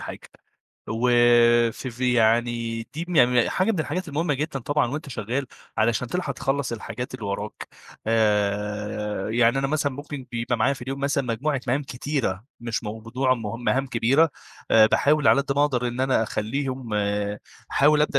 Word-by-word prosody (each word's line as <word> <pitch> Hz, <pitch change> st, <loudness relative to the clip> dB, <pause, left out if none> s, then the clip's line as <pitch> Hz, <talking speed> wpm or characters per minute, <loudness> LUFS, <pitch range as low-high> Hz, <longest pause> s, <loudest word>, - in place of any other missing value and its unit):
حاجة، -, -, -9 dB, 0.6 s
وف 115 Hz, +3 st, 0 dB, 0.7 s
في 125 Hz, 0 st, -2 dB
يعني 115 Hz, 0 st, +1 dB
دي 165 Hz, +2 st, -3 dB
م 175 Hz, -, -2 dB
ي 125 Hz, -2 st, +5 dB
ي -, -, -2 dB
حاجة 185 Hz, +5 st, +1 dB
من 180 Hz, -, -1 dB
الحاجات 180 Hz, +2 st, -3 dB
المهمة 150 Hz, 0 st, 0 dB
جدًا 150 Hz, 0 st, -3 dB
طبعًا 145 Hz, +2 st, +1 dB
وأنت 150 Hz, +1 st, -5 dB
شغال، 125 Hz, +3 st, -3 dB, 0.3 s
علشان 115 Hz, +2 st, +1 dB
تلحق 165 Hz, -3 st, -2 dB
تخلّص 135 Hz, 0 st, -2 dB
الحاجات 125 Hz, +2 st, -6 dB
اللي 115 Hz, -5 st, -6 dB
وراك، 100 Hz, +1 st, -5 dB, 0.4 s
آآ، 105 Hz, -1 st, 0 dB
يعني 120 Hz, +3 st, +3 dB
أنا 135 Hz, -, +1 dB
مثلًا 145 Hz, -1 st, 0 dB
ممكن 145 Hz, -1 st, -7 dB
بيبقى 120 Hz, +1 st, -1 dB
معايا 120 Hz, +5 st, +2 dB
في 130 Hz, -, -10 dB
اليوم 135 Hz, +2 st, -5 dB
مثلًا 140 Hz, -1 st, 0 dB
مجموعة 130 Hz, +4 st, -1 dB
مهام 130 Hz, +4 st, +1 dB
كتيرة، 130 Hz, -7 st, -3 dB, 0.2 s
مش 115 Hz, -1 st, -3 dB
موضوع 115 Hz, +5 st, -1 dB
مه 115 Hz, -1 st, -5 dB
مهام 135 Hz, +3 st, 0 dB
كبيرة، 130 Hz, +7 st, +3 dB, 0.4 s
باحاول 140 Hz, +7 st, +5 dB
على 140 Hz, -, +6 dB
قد 140 Hz, -1 st, -2 dB
ما 145 Hz, -, +4 dB
أقدر 125 Hz, -4 st, 0 dB
إن 120 Hz, +1 st, -4 dB
أنا 130 Hz, -3 st, +2 dB
أخلّيهم 130 Hz, +3 st, -3 dB, 0.8 s
أحاول 150 Hz, +1 st, +4 dB
أبدأ 145 Hz, -2 st, +2 dB
125 Hz, 165 wpm, -24 LUFS, 115-140 Hz, 0.8 s, على